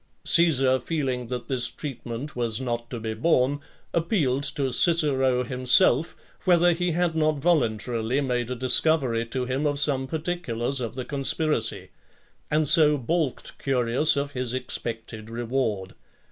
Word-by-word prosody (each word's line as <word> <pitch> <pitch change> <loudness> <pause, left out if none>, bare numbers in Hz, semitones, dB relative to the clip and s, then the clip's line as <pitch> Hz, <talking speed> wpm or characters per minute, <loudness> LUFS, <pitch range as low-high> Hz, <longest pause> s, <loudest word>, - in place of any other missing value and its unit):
Caesar, 135 -6 +4
feeling 130 -4 -3
that 125 0 -6
this 125 -3 0
treatment 135 0 -7
was 115 -2 0
not 120 -2 -4
to 120 - -6
be 110 0 -4
borne, 130 +3 +1 0.3
appealed 160 - 0
to 140 -2 -1
Cicero 135 -6 +5
himself, 125 +4 +3 0.3
whether 175 -1 +4
he 175 0 -2
had 175 0 0
not 155 -1 +1
voluntarily 125 -5 0
made 125 -3 -2
a 125 - -3
discovery 125 -2 +1
to 125 +1 -3
him 130 +4 -1
of 145 -1 -1
some 135 -2 +1
particulars 140 -6 -2
of 120 -2 -5
the 130 -2 -5
conspiracy; 140 -3 -1 0.6
and 155 0 +1
so 150 -1 +6
baulked 155 +1 -3
Curius 130 +2 +2
of 140 0 -2
his 125 -2 -4
expected 115 -3 -5
reward. 115 -5 -3
130 Hz, 140 wpm, -24 LUFS, 120-150 Hz, 0.6 s, so